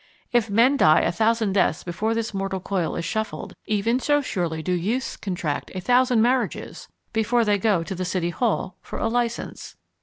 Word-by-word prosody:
If 240 Hz, -3 st, +2 dB
men 235 Hz, +7 st, +4 dB
die 155 Hz, -, +5 dB
a -, -, +1 dB
thousand 220 Hz, +2 st, +1 dB
deaths 185 Hz, -5 st, +2 dB
before 215 Hz, +6 st, -1 dB
this 225 Hz, -1 st, -2 dB
mortal 195 Hz, -1 st, -2 dB
coil 180 Hz, -3 st, -2 dB
is 170 Hz, -, -3 dB
shuffled, 220 Hz, +5 st, -3 dB
even 220 Hz, +4 st, +1 dB
so 290 Hz, +2 st, +2 dB
surely 170 Hz, -, -2 dB
do 180 Hz, -, -2 dB
youths 210 Hz, +9 st, -1 dB
contract 175 Hz, -7 st, -3 dB
a -, -, -2 dB
thousand 245 Hz, +3 st, +3 dB
marriages 250 Hz, +1 st, -1 dB, 0.3 s
before 230 Hz, +1 st, +2 dB
they 205 Hz, -1 st, +2 dB
go 195 Hz, -5 st, +2 dB
to 180 Hz, -, -5 dB
the 185 Hz, 0 st, -3 dB
City 175 Hz, -1 st, -1 dB
Hall 190 Hz, -2 st, -1 dB
for -, -, -7 dB
a -, -, 0 dB
license. 235 Hz, 0 st, -3 dB
210 Hz, 185 wpm, -24 LUFS, 180-235 Hz, 0.3 s, die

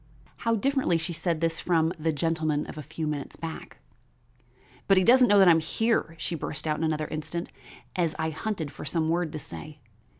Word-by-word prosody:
How 230 Hz, 0 st, +1 dB
differently 265 Hz, -6 st, +2 dB
she 165 Hz, +1 st, -3 dB
said 165 Hz, -1 st, -1 dB
this 165 Hz, -1 st, 0 dB
from 165 Hz, -1 st, +2 dB
the 160 Hz, +1 st, +1 dB
gentleman 155 Hz, -1 st, 0 dB
of -, -, -8 dB
a 155 Hz, -, -6 dB
few 155 Hz, +2 st, -5 dB
minutes 150 Hz, -2 st, -4 dB
back! 165 Hz, -1 st, -7 dB, 1.1 s
"But 195 Hz, -, +5 dB
he 185 Hz, -, +5 dB
doesn't 250 Hz, +4 st, +6 dB
know 205 Hz, -, +5 dB
that 195 Hz, -2 st, +7 dB
I -, -, +9 dB
am 165 Hz, -, +5 dB
here," 165 Hz, +1 st, 0 dB
she 165 Hz, -, -3 dB
burst 150 Hz, -2 st, -4 dB
out 155 Hz, -1 st, 0 dB
in -, -, -1 dB
another 155 Hz, -1 st, 0 dB
instant, 155 Hz, +3 st, -4 dB, 0.4 s
as 170 Hz, -3 st, 0 dB
I 160 Hz, 0 st, -1 dB
hunted 160 Hz, -3 st, -3 dB
for 135 Hz, -, -9 dB
some 160 Hz, +2 st, 0 dB
word 170 Hz, -1 st, 0 dB
to -, -, -3 dB
say. 155 Hz, 0 st, -9 dB
165 Hz, 205 wpm, -27 LUFS, 155-175 Hz, 1.1 s, I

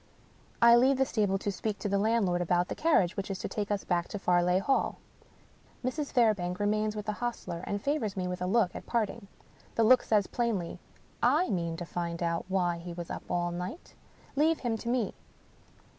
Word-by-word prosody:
I 235 Hz, 0 st, +9 dB
leave 260 Hz, +2 st, +4 dB
the 265 Hz, -, +3 dB
stable 205 Hz, -6 st, +1 dB
to 205 Hz, +1 st, -2 dB
speak 205 Hz, +2 st, -3 dB
to -, -, -3 dB
the 200 Hz, 0 st, +1 dB
landlord 200 Hz, -5 st, +2 dB
about 175 Hz, +1 st, +1 dB
the -, -, -1 dB
carriage 290 Hz, -, +2 dB
which 195 Hz, 0 st, -4 dB
is 195 Hz, -, -2 dB
to -, -, -4 dB
take 205 Hz, -1 st, -3 dB
us 205 Hz, -1 st, -1 dB
back 175 Hz, -1 st, 0 dB
to -, -, -5 dB
Farleigh 180 Hz, -1 st, +3 dB
Hall. 270 Hz, +8 st, +1 dB, 0.9 s
Mrs. 285 Hz, +3 st, -2 dB
Fairbank 205 Hz, -8 st, +2 dB
remains 215 Hz, +1 st, +1 dB
with 210 Hz, -1 st, -5 dB
the 210 Hz, -, 0 dB
hostler, 210 Hz, -6 st, -4 dB
and 205 Hz, -, -1 dB
favors 280 Hz, -9 st, -1 dB
me 180 Hz, -1 st, -1 dB
with 180 Hz, 0 st, -4 dB
a 180 Hz, -, 0 dB
look 195 Hz, -2 st, +2 dB
at -, -, -8 dB
parting. 225 Hz, -2 st, -1 dB, 0.5 s
The 230 Hz, -, +3 dB
look 250 Hz, +3 st, +6 dB
says 210 Hz, -3 st, +2 dB
plainly, 220 Hz, -8 st, -2 dB, 0.4 s
"/ -, -, -15 dB, 0.3 s
mean 170 Hz, -3 st, -1 dB
to 175 Hz, -, -5 dB
find 170 Hz, 0 st, -3 dB
out 170 Hz, 0 st, -1 dB
why 180 Hz, -3 st, 0 dB
he 170 Hz, 0 st, -7 dB
was 170 Hz, 0 st, -6 dB
up -, -, -7 dB
all 175 Hz, -1 st, 0 dB
night. 180 Hz, -, -6 dB, 0.4 s
Leave 315 Hz, +3 st, +2 dB
him 235 Hz, -3 st, 0 dB
to 235 Hz, -, -4 dB
Me." 240 Hz, -4 st, 0 dB
200 Hz, 205 wpm, -30 LUFS, 180-230 Hz, 0.9 s, I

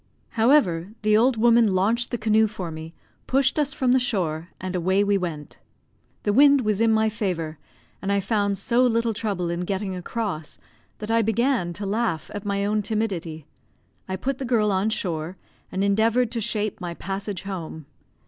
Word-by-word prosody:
However, 220 Hz, -, +2 dB
the 215 Hz, 0 st, +4 dB
old 240 Hz, +2 st, +3 dB
woman 230 Hz, -3 st, +4 dB
launched 225 Hz, +6 st, +1 dB
the 240 Hz, -, -2 dB
canoe 220 Hz, 0 st, +3 dB
for 190 Hz, -6 st, -6 dB
me, 160 Hz, +1 st, -8 dB, 0.4 s
pushed 270 Hz, +2 st, +2 dB
us 295 Hz, -1 st, +1 dB
from 260 Hz, -3 st, +1 dB
the 260 Hz, -, +5 dB
shore, 175 Hz, -9 st, -2 dB
and 185 Hz, 0 st, -4 dB
away 185 Hz, +3 st, +2 dB
we 205 Hz, 0 st, +2 dB
went. 170 Hz, -6 st, -4 dB, 0.6 s
The 205 Hz, -, +1 dB
wind 280 Hz, +2 st, +6 dB
was 215 Hz, -2 st, 0 dB
in 225 Hz, 0 st, +4 dB
my 220 Hz, 0 st, +3 dB
favour, 175 Hz, -8 st, -3 dB, 0.4 s
and 195 Hz, -, -2 dB
I 200 Hz, -, +2 dB
found 200 Hz, 0 st, 0 dB
so 240 Hz, +5 st, +1 dB
little 230 Hz, -2 st, +2 dB
trouble 200 Hz, -5 st, -2 dB
in 170 Hz, -, -3 dB
getting 190 Hz, +1 st, -2 dB
across 180 Hz, -4 st, -4 dB, 0.4 s
that 215 Hz, +1 st, -5 dB
I 230 Hz, 0 st, +4 dB
began 225 Hz, -3 st, +1 dB
to 200 Hz, +4 st, -5 dB
laugh 205 Hz, -5 st, -1 dB
at 205 Hz, 0 st, -6 dB
my 200 Hz, 0 st, 0 dB
own 210 Hz, +1 st, +1 dB
timidity. 190 Hz, -8 st, -3 dB, 0.6 s
I 190 Hz, -, -1 dB
put 260 Hz, +8 st, -3 dB
the -, -, -3 dB
girl 225 Hz, -4 st, +2 dB
on 195 Hz, +3 st, +1 dB
shore, 175 Hz, -4 st, -3 dB, 0.3 s
and 190 Hz, -, -1 dB
endeavoured 220 Hz, +4 st, +2 dB
to 230 Hz, -, -2 dB
shape 215 Hz, -2 st, -2 dB
my 175 Hz, -1 st, -4 dB
passage 195 Hz, +1 st, -5 dB
home. 165 Hz, -6 st, -6 dB
205 Hz, 180 wpm, -24 LUFS, 185-230 Hz, 0.6 s, wind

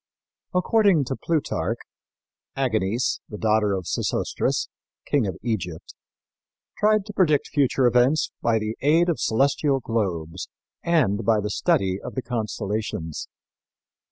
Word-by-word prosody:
According 190 Hz, -3 st, +4 dB
to 135 Hz, -, -3 dB
Plutarch, 120 Hz, -, -1 dB, 0.8 s
Aganice, 115 Hz, -3 st, 0 dB
the 105 Hz, -, -7 dB
daughter 105 Hz, -1 st, +2 dB
of 95 Hz, -2 st, -3 dB
Sesostris, -, -, -1 dB, 0.4 s
King 135 Hz, -7 st, +1 dB
of 95 Hz, -, -4 dB
Egypt, 90 Hz, -9 st, -4 dB, 0.9 s
tried 215 Hz, -1 st, +3 dB
to 210 Hz, -, -8 dB
predict 155 Hz, -7 st, +2 dB
future 135 Hz, -2 st, +2 dB
events 125 Hz, +5 st, +3 dB
by 115 Hz, -1 st, +2 dB
the 110 Hz, +1 st, -3 dB
aid 165 Hz, +5 st, +4 dB
of 170 Hz, -, 0 dB
celestial 135 Hz, +3 st, +2 dB
globes 90 Hz, -8 st, -3 dB, 0.3 s
and 125 Hz, -11 st, +2 dB
by 110 Hz, 0 st, +3 dB
the 105 Hz, 0 st, -3 dB
study 95 Hz, -1 st, +1 dB
of -, -, -8 dB
the 130 Hz, -, -2 dB
constellations. 105 Hz, -, -3 dB
115 Hz, 125 wpm, -24 LUFS, 105-145 Hz, 0.9 s, According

